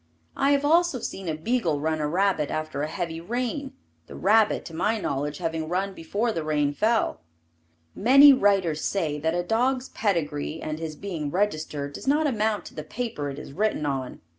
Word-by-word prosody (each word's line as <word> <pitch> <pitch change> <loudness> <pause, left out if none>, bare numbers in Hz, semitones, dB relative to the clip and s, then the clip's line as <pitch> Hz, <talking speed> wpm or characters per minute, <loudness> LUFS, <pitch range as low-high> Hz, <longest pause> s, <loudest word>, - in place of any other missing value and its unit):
I 275 - +2
have 285 0 +1
also 335 -1 +3
seen 190 -6 -5
a 155 - -1
beagle 170 -4 0
run 155 +1 -1
a 150 - 0
rabbit 180 -2 +1
after 155 -2 -3
a 150 - -1
heavy 165 +1 -4
rain, 250 - -3 0.3
the - - -10
rabbit, 215 +2 +3
to 165 - -9
my 210 +7 0
knowledge, 145 -3 -2
having 160 -2 -3
run 190 +3 -1
before 200 +8 -2
the 165 -7 -3
rain 150 -2 +1
fell. 220 - +1 0.7
Many 275 +6 +8
writers 195 - +2
say 155 -7 -1
that 160 +3 0
a 175 - 0
dog's 250 +6 0
pedigree 160 -6 -1
and 155 0 -4
his 160 -2 -5
being 165 -5 -4
registered, 155 -6 -2
does - - -9
not 300 +3 +3
amount 220 -6 0
to - - -10
the 155 - -6
paper 210 -6 -4
it 140 - -7
is 145 - -9
written 205 -3 0
on. 135 -3 -3
175 Hz, 190 wpm, -25 LUFS, 155-225 Hz, 0.7 s, Many